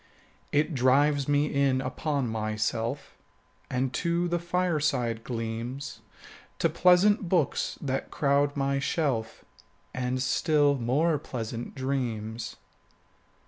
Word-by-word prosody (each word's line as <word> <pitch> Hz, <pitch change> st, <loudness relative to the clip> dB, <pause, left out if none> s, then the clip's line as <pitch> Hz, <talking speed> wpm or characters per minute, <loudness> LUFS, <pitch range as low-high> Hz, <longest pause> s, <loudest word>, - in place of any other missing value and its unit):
It 150 Hz, +3 st, +1 dB
drives 140 Hz, +2 st, +3 dB
me 145 Hz, 0 st, +3 dB
in 140 Hz, -2 st, +2 dB
upon 140 Hz, +1 st, -2 dB
myself 110 Hz, +3 st, -2 dB, 0.5 s
5 125 Hz, -, -3 dB
And 130 Hz, 0 st, 0 dB
to 170 Hz, +3 st, 0 dB
the 175 Hz, 0 st, 0 dB
fireside 150 Hz, -10 st, 0 dB
gleams, 120 Hz, +4 st, -4 dB, 0.6 s
To -, -, +2 dB
pleasant 185 Hz, +2 st, +4 dB
books 170 Hz, -6 st, +1 dB
that 135 Hz, -1 st, -3 dB
crowd 145 Hz, 0 st, +1 dB
my 140 Hz, 0 st, +1 dB
shelf, 140 Hz, -6 st, -1 dB, 0.5 s
And 125 Hz, 0 st, -1 dB
still 145 Hz, +2 st, +3 dB
more 140 Hz, +5 st, +1 dB
pleasant 120 Hz, -4 st, -5 dB
dreams. 120 Hz, -4 st, -3 dB
140 Hz, 105 wpm, -28 LUFS, 120-150 Hz, 0.6 s, pleasant